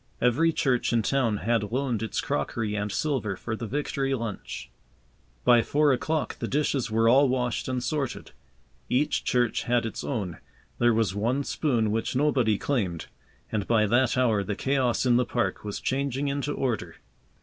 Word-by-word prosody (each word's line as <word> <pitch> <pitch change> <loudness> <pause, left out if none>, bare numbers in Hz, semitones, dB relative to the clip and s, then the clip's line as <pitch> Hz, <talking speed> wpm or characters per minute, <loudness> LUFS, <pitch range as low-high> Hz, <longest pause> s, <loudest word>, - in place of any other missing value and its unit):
Every 135 +8 +3
church 130 -7 +1
in 115 -2 +2
town 120 -4 +1
had 115 -3 +1
loaned 125 -3 -1
its 110 - -2
crockery 105 +9 -2
and 105 0 -2
silver 125 -7 -1
for 110 +4 -4
the 115 0 -5
Victory 135 0 -1
lunch. 115 -4 -6 0.7
By 120 -1 +6
four 145 +4 +3
o'clock 155 +5 -2
the - - -2
dishes 140 -4 0
were 115 +1 +2
all 135 +3 +5
washed 125 -2 -1
and 130 -1 -2
sorted. 145 -3 -3 0.6
Each 135 +4 +1
church 120 -3 +1
had 120 -1 +1
its 115 - -5
own. 100 - -3 0.4
There 120 0 +4
was 110 -4 +1
one 120 +7 0
spoon 120 -7 0
which 115 +3 -1
nobody 130 -7 +2
claimed. 95 - -1 0.5
And 105 -2 -2
by 110 -2 +3
that 120 +4 +2
hour 115 -5 +2
the 105 +1 -3
chaos 130 0 +1
in 120 -1 +4
the 125 - +3
park 120 0 -1
was 105 -1 -4
changing 140 +1 -1
into 140 +1 -2
order. 125 -7 -2
120 Hz, 170 wpm, -27 LUFS, 110-135 Hz, 0.7 s, By